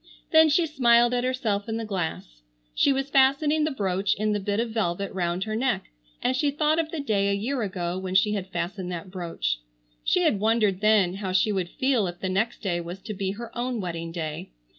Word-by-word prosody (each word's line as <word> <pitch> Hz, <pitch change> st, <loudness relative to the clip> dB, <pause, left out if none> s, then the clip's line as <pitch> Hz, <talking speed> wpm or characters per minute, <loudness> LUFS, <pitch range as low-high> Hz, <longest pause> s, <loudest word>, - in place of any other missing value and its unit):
Then 320 Hz, 0 st, +7 dB
she 330 Hz, +3 st, +3 dB
smiled 240 Hz, -5 st, +4 dB
at 245 Hz, 0 st, +1 dB
herself 230 Hz, -5 st, -1 dB
in 225 Hz, -, -1 dB
the 225 Hz, -, -3 dB
glass. 165 Hz, -, -4 dB, 0.3 s
She -, -, +3 dB
was 270 Hz, +1 st, -1 dB
fastening 290 Hz, +3 st, +3 dB
the -, -, +1 dB
brooch 195 Hz, -7 st, 0 dB
in 215 Hz, +1 st, 0 dB
the 205 Hz, -, 0 dB
bit 205 Hz, +1 st, -1 dB
of 230 Hz, -1 st, -1 dB
velvet 200 Hz, -3 st, -1 dB
round 175 Hz, 0 st, -1 dB
her 215 Hz, +1 st, -3 dB
neck, 240 Hz, -, -1 dB, 0.3 s
and 255 Hz, -, +2 dB
she 285 Hz, +2 st, +2 dB
thought 300 Hz, +2 st, +1 dB
of 320 Hz, -1 st, -1 dB
the 325 Hz, -, -5 dB
day 205 Hz, -8 st, +1 dB
a -, -, +2 dB
year 240 Hz, +6 st, -1 dB
ago 185 Hz, -3 st, -3 dB
when 190 Hz, 0 st, -4 dB
she 210 Hz, +2 st, +4 dB
had 195 Hz, -3 st, -3 dB
fastened 180 Hz, +1 st, -4 dB
that 175 Hz, +1 st, -6 dB
brooch. 165 Hz, -, -2 dB, 0.4 s
She 120 Hz, -, +2 dB
had 200 Hz, -, +2 dB
wondered 215 Hz, -3 st, +2 dB
then 205 Hz, -4 st, +3 dB
how 190 Hz, -2 st, -3 dB
she 190 Hz, +3 st, +3 dB
would 185 Hz, -3 st, -1 dB
feel 260 Hz, -5 st, +1 dB
if 175 Hz, 0 st, -7 dB
the 190 Hz, -, -2 dB
next 205 Hz, +6 st, -1 dB
day 175 Hz, -4 st, 0 dB
was 170 Hz, +2 st, -7 dB
to 215 Hz, -, -5 dB
be 195 Hz, -1 st, -2 dB
her 230 Hz, +2 st, -9 dB
own 245 Hz, -1 st, -2 dB
wedding 170 Hz, -3 st, -4 dB
day. 160 Hz, -, -5 dB
205 Hz, 225 wpm, -26 LUFS, 185-245 Hz, 0.4 s, Then